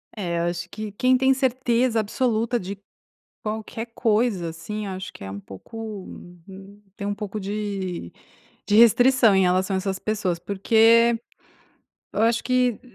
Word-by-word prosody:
É, 175 -5 -2
eu - - 0
acho 175 0 -3
que 215 -1 -6
quem 255 +5 +3
tem 265 +1 +4
certeza 255 -2 +1
absoluta 230 +2 0
de 195 +2 -7 0.6
qualquer 220 +2 -4
coisa, 215 -6 +1
assim, 205 +6 -6
acho 190 0 -6
que - - -12
é 95 - -6
um 100 - -6
pouco, 210 - -8 0.4
hum, 195 +2 -13
tem 200 -2 -5
um 205 - -2
pouco 210 0 -5
de 195 - -4 0.5
de 205 - +1
restrição 235 -1 +6
em 190 - +4
relação 185 +2 +2
a - - +1
essas 190 0 -3
pessoas, 200 -5 -1
porque, 225 +5 +4 0.9
eu 215 - 0
acho, 230 +1 +3
m 250 -2 +2
que - - -34
210 Hz, 160 wpm, -24 LUFS, 190-230 Hz, 0.9 s, restrição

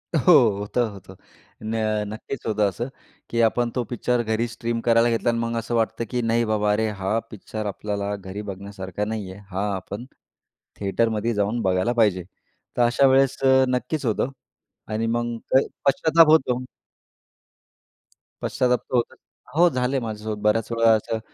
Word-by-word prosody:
हो, 155 +4 +5 0.3
होतं-होतं 105 -3 -3 0.5
न 110 - -3 0.3
नक्कीच 110 +4 -7
होतं 105 -2 +2
असं, 120 +6 -4 0.4
की 115 - +1
आपण 120 +1 +2
तो 125 - 0
पिक्चर 120 0 0
घरी 110 +1 0
स्ट्रीम 115 0 -3
करायला 115 0 +4
घेतला 115 +1 +1
आणि 115 - +1
मग 115 0 -2
असं 115 +1 -3
वाटतं, 115 0 0
की 125 -1 -1
नाही 115 +1 +1
बाबा 105 -1 +1
अरे 110 +1 +1
हा 95 +4 0
पिक्चर 110 +1 -6
आपल्याला 100 0 -3
घरी 95 +1 -7
बघण्यासारखा 100 -1 -5
नाही 105 -3 -4
आहे. 95 - -11
हा 95 +2 -1
आपण 100 +5 -6 0.7
थिएटरमध्येच 110 +2 0
जाऊन 105 +4 0
बघायला 95 +5 +1
पाहिजे. 105 -6 +2 0.5
तर - - +3
अशा 125 +3 +3
वेळेस 135 0 +3
अ, 130 0 +5
नक्कीच 130 +4 -2
होतं 120 +3 0 0.6
आणि 110 +1 -1
मग 120 0 -1
प 130 - +7 0.3
पश्चाताप 160 +3 +5
होतो. 130 -5 +3 1.8
पश्चाताप 125 -1 +1
तर - - -6
होतोच. 120 - 0 0.4
हो, 175 +2 +6
झाले 130 -1 0
माझ्यासोबत 110 -2 -5
बऱ्याच 105 +2 +1
वेळा 115 -1 +4
असं 110 +1 -2
115 Hz, 155 wpm, -23 LUFS, 105-120 Hz, 1.8 s, प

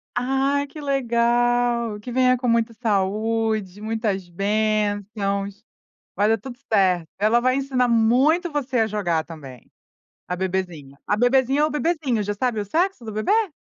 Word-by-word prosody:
Ai, 270 +3 +1
que 300 +2 -10
legal, 240 -3 +1
que 245 +4 -8
venha 255 0 +3
com 250 0 -3
muita 230 0 +1
saúde, 215 -1 -1
muitas 215 -4 -2
bênçãos, 205 +1 -1 0.5
vai 205 +1 +2
dar 225 - +3
tudo 250 0 -10
certo, 185 -5 +2
ela 215 +4 +3
vai 255 +1 +2
ensinar 265 -2 0
muito 255 +10 +3
você 270 -4 -1
a 220 - +2
jogar 175 -7 -1
também, 140 -7 -11 0.6
a 180 - -3
bebezinha. 175 -7 -4
A 210 - +1
bebezinha 260 +4 +3
ou 305 - +3
o - - -9
bebezinho, 300 -7 0
já 205 0 -3
sabe 230 0 -1
o - - -3
sexo 335 - -1
do 220 - -6
bebê? 375 - +1
225 Hz, 155 wpm, -23 LUFS, 205-255 Hz, 0.6 s, venha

